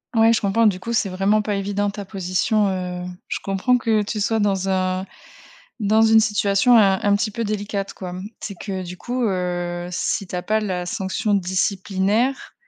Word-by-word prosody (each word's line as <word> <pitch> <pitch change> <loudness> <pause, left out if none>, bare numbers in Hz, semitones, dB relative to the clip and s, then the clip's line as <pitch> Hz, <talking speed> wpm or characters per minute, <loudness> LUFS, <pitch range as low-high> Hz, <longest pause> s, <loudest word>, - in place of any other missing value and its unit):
Ouais. 225 0 +5
Je 225 - +1
comprends. 220 +3 +3
Du 190 -3 +1
coup, 230 - -4
c'est 220 - +2
vraiment 195 +3 +2
pas 210 -1 -2
évident 200 +1 -1
ta 200 0 -6
position, 195 +2 0
heu, 180 -1 -4 0.2
je - - -2
comprends 195 +6 +2
que 225 -3 +1
tu 210 +1 -4
sois 220 +2 +1
dans 195 -2 0
un 185 0 0 0.7
dans 215 +1 +3
une 220 0 +6
situation 210 +2 +3
un 195 -3 +4
un 205 -1 +4
petit 215 +1 -1
peu 230 +3 -3
délicate, 205 -2 -3
quoi. 180 -2 -6 0.3
C'est 200 - -5
que 190 0 -5
du 180 0 -7
coup, 245 +7 -3
heu, 175 -2 -2
si 190 +2 -1
tu 180 - -6
as 180 - -3
pas 215 0 +1
la 185 -4 -3
sanction 200 +1 -2
disciplinaire, 195 +5 0
200 Hz, 190 wpm, -22 LUFS, 185-215 Hz, 0.7 s, une